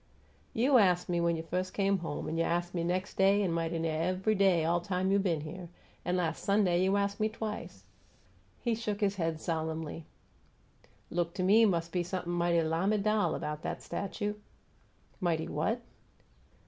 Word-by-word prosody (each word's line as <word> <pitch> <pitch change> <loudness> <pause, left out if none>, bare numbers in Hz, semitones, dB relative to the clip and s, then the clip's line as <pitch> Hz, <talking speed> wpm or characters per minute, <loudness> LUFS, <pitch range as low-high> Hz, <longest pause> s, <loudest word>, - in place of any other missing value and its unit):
"You 255 +3 +5
ast 180 -4 +3
me 175 -1 +1
when 170 0 +2
you 160 - -4
firs' 180 +2 -2
come 195 0 +1
home, 165 -3 -4
an' 165 +1 -2
you - - +3
ast 175 +1 -1
me 170 -2 -1
nex' 180 +2 -1
day, 195 +2 +4
an' 185 - 0
mighty 165 0 -1
near 160 -1 -1
ev'y 185 +5 +1
day 190 -5 +3
all 170 +1 +2
time 185 +1 -1
you 200 - +4
been 175 -6 0
here; 170 +3 -7 0.3
an' 180 0 0
las' 165 -3 -1
Sunday 195 -3 +2
you 190 +2 +3
ast 200 0 -1
me 215 0 +2
twicet." 215 -1 -6 0.8
He 235 - 0
shook 215 -2 -2
his 200 -1 +1
head 165 -3 -1
solemnly. 160 -1 -3 1.1
"Look 170 0 -1
to 185 - -1
me 215 +5 +6
mus' 170 -5 +1
be 175 +1 -1
somep'm 175 0 -3
might 170 0 +2
lamiDAL 200 +6 +1
'bout 150 0 -4
'at - - -4
statue!" 205 +1 -3 0.9
"Mighty 165 -3 0
what?" 220 +11 -1
180 Hz, 175 wpm, -31 LUFS, 165-200 Hz, 1.1 s, me